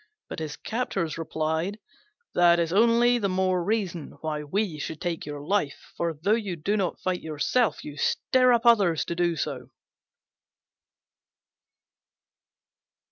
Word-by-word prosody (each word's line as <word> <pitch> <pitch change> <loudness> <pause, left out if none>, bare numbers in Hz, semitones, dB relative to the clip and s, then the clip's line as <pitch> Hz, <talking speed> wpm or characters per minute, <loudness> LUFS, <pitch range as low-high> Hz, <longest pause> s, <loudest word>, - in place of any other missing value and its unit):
But - - -5
his 155 -2 -4
captors 195 -9 -3
replied, 160 +4 -2 0.6
"That 175 -1 +5
is 165 0 0
only 235 +3 +4
the 200 -3 0
more 185 -1 +1
reason 190 -6 -2
why 155 -1 -3
we 170 +1 -2
should 155 +1 -5
take 170 -4 -3
your 145 -1 -5
life; 150 -2 -2
for, 170 -1 -1
though 165 +8 -1
you 210 -5 0
do 195 +6 -1
not 195 -4 -1
fight 185 -1 -2
yourself, 160 +10 0
you 145 -1 -8
stir 255 - +2
up 235 -1 +2
others 200 -9 +4
to 170 - -3
do 175 -1 +1
so." - - -4
175 Hz, 135 wpm, -26 LUFS, 160-210 Hz, 0.6 s, That